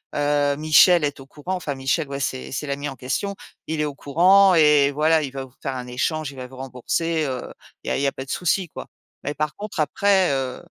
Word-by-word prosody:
Heu, 145 -1 +1
Michel 155 +2 +5
est 145 -1 -4
au - - -12
courant- 150 +7 -6
enfin, 155 -6 -4
Michel, 135 +3 -1
ouais, 140 0 -4
c'est 130 -1 -3
c'est 145 +2 -4
l'ami 140 +1 -3
en 135 - -8
question- 195 +11 -3 0.3
il 160 0 -3
est 150 - +1
au 145 -2 -5
courant 185 +7 +5
et 150 -3 +5
voilà, 155 +2 +3
il 135 -3 -4
va 135 -1 -6
vous 130 - -20
faire 135 -2 -3
un 125 0 -6
échange, 140 +4 -2
il - - -14
va 130 -1 -6
vous 130 +1 -14
rembourser, 145 +6 -2
heu, 130 -2 -3 0.4
il - - -12
y - - -1
a - - 0
il - - -2
y - - +3
a - - +1
pas 135 - -7
de 130 - -7
souci, 180 +1 0
quoi.» - - -9 0.4
Mais 145 - -3
par 150 0 -3
contre, 210 -3 -7
après, 190 +2 +2
heu 130 -2 -3
145 Hz, 250 wpm, -23 LUFS, 135-160 Hz, 0.4 s, Michel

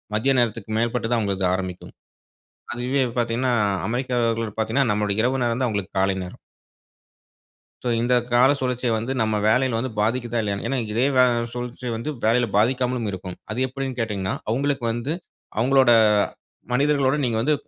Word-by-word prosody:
மதிய 135 +6 +2
நேரத்துக்கு 115 -2 -1
மேற்பட்டு 115 0 0
தான் 120 - +3
அவுங்கள்து 100 -3 -1
ஆரம்பிக்கும். 95 -1 -5 0.8
அதுவே 125 +3 0 0.2
பார்த்தீங்கனா 120 +2 +1 0.4
அமெரிக்கர்கள் 115 -3 -1
பார்த்தீங்கனா, 115 +4 +1
நம்முடைய 105 0 0
இரவு 130 +2 +1
நேரம் 120 +1 0
தான் 130 - +2
அவங்களுக்கு 100 -3 -4
காலை 95 0 +2
நேரம். 90 - -10 1.5
சோ - - 0
இந்த 120 +2 +2 0.2
கால 125 +3 +6
சுழற்சிய 125 -1 -1
வந்து, 115 +4 -2
நம்ம 110 -1 +1
வேலையில 125 +1 +2
வந்து 130 +2 -2
பாதிக்கிதா 120 +2 0
இல்லையானு 100 -1 -3
ஏன்னா 135 - 0
இதே 115 +4 +2
வ - - +6 0.3
சுழற்சி 125 +1 -5
வந்து 115 +7 -4
வேலையில 120 +2 +3
பாதிக்காமலும் 125 +1 +1
இருக்கும். 90 -1 -7
அது 110 - -3
எப்படினு 135 0 -4
கேட்டீங்கனா, 100 -4 -2 0.2
அவங்களுக்கு 135 +2 0
வந்து, 120 +6 -3 0.5
அவங்களோட 130 +1 +4 0.8
மனிதர்களோடு 140 +1 +2
நீங்க 115 -2 0
வந்து 150 +5 +2
120 Hz, 150 wpm, -23 LUFS, 110-130 Hz, 1.5 s, கால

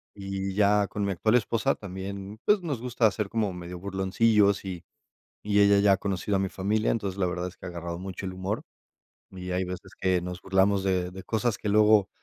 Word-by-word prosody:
Y 95 -1 -4
ya, 105 -1 +4
con 105 - -3
mi 100 - 0
actual 110 +6 +2
esposa 120 +3 +1
también, 100 +2 -7
pues, 205 -2 +4
nos 145 -9 -3
gusta 120 -4 +2
ser 105 -2 -3
como 110 -4 0
medio 90 0 -7
burloncillos 100 +2 +2
y 90 -2 -5 0.6
y 105 0 +3
ella 100 0 +6
ya 100 0 +5
ha 95 - +4
conocido 100 +1 -1
a - - 0
mi 95 -1 -1
familia. 105 +3 0
Entonces, 100 -4 -2
la 90 - +2
verdad 90 0 -2
es 90 - -10
que - - -9
ha - - -4
agarrado 85 0 -5
mucho 95 +1 -6
el 95 - -4
humor, 95 +3 -3 0.7
y 90 -1 -7
hay 90 +1 0
veces 90 0 -7
que 95 -1 +2
nos 90 0 -6
burlamos 95 +1 +2
de 90 -2 0
de 95 +1 -9
cosas 115 +1 0
que 105 - -3
luego 105 -1 +5
100 Hz, 215 wpm, -27 LUFS, 95-105 Hz, 0.7 s, ella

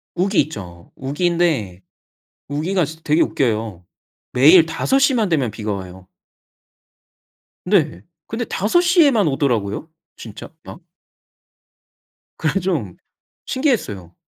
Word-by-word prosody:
우기 190 +3 +1
있죠. 90 - -8
우기인데 145 - -1 0.7
우기가 165 +5 0
진 160 +2 -9
되게 155 +2 +2
웃겨요. 110 - -1 0.5
매일 155 +7 +7
5 265 +11 0
시만 255 -6 +2
되면 140 -9 0
비가 105 -1 -4
와요. 95 -1 -8 1.6
네. 180 -6 +1 0.2
근데 230 +2 -3
5 220 - +1
시에만 305 - +4
오더라고요 125 -3 -1 0.3
진짜 110 +2 -10
막. 170 - -11 1.5
그래서 195 - 0
좀 155 - -3 0.5
신기했어요. 105 - -2
155 Hz, 210 characters per minute, -20 LUFS, -, 1.6 s, 매일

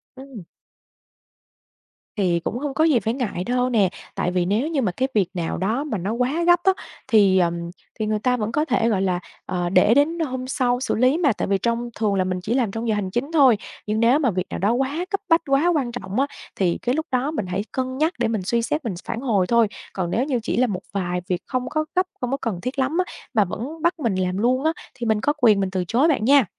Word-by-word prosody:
Ừm. 260 -8 -10 1.7
Thì 180 -4 +2
cũng 205 +7 -3
hông 290 -1 -3
có 315 - +2
gì 295 -7 +4
phải 225 +1 -1
ngại 225 -8 -3
đâu 250 +2 0
nè, 210 -6 +3 0.3
tại 180 - -1
vì 180 -1 +1
nếu 215 - +1
như 305 -5 0
mà 195 -6 0
cái 260 +7 -1
việc 200 -5 +2
nào 170 -3 -2
đó 220 +10 0
mà 230 -9 -3
nó 195 +5 -2
quá 255 +8 0
gấp 350 0 +6
á 385 0 +5 0.3
thì, 200 -6 +5
ờm, 170 -1 +1 0.4
thì 215 - 0
người 215 0 0
ta 250 +2 +1
vẫn 215 0 -2
có 300 +6 +1
thể, 245 -5 +1
gọi 200 -4 +1
là, 185 -2 0 0.3
ờ, 175 -1 -2
để 195 +4 +5
đến 310 +5 +2
hôm 260 -4 -3
sau 245 -1 +1
xử - - -1
lý 255 +6 +3
mà. 290 -9 +3
Tại - - -3
vì 195 0 +2
trong 235 +4 -1
thường 210 -3 +1
là 185 - +2
mình 185 0 -2
chỉ 225 - -1
làm 240 -6 +1
trong 225 +2 -4
giờ 215 - +2
hành 190 -2 -2
chính 275 +8 -2
thôi, 270 -9 +5 0.3
nhưng 215 +1 0
nếu 240 +6 +4
mà 255 -7 +2
việc 185 0 -2
nào - - -4
đó 205 +4 +2
quá 275 +7 -1
cấp 395 - -1
bách, 330 0 +5
quá 275 +5 +3
quan 260 -5 0
trọng 205 -1 -4
á 275 - +2 0.3
thì 180 -3 +1
cái 245 +3 0
lúc 315 +1 -1
đó 260 +4 0
mình 215 -11 -3
hãy 185 +2 -1
cân 260 0 -3
nhắc 315 +4 +1
để 235 - +2
mình 220 -3 -1
suy 235 +3 +1
xét 290 +4 -2
mình 210 - -1
phản 230 - -3
hồi 205 -8 +1
thôi. 235 -2 +4 0.3
Còn 180 -3 -2
nếu 250 - +1
như 265 -4 0
chỉ - - -2
là 255 0 +3
một 190 -4 -3
vài 180 -2 -1
việc 180 0 0
không 255 -1 -2
có 310 0 -1
gấp, 370 0 +3 0.2
không 250 +1 -2
có 275 - 0
cần 205 -10 -4
thiết 265 +2 -4
lắm 275 +6 0
á - - -11 0.2
mà 210 -3 +4
vẫn 285 - -6
bắt 340 0 +1
mình 230 -8 0
làm 185 0 -1
luôn 255 +5 +1
á, 320 +1 +2 0.2
thì 245 -3 -6
mình 220 -1 +1
có 295 - +2
quyền 215 -4 +5
mình 190 -1 0
từ 185 -1 -1
chối 260 +8 +3
bạn 275 -9 +1
nha! 275 -2 +6
235 Hz, 265 wpm, -23 LUFS, 195-275 Hz, 1.7 s, gấp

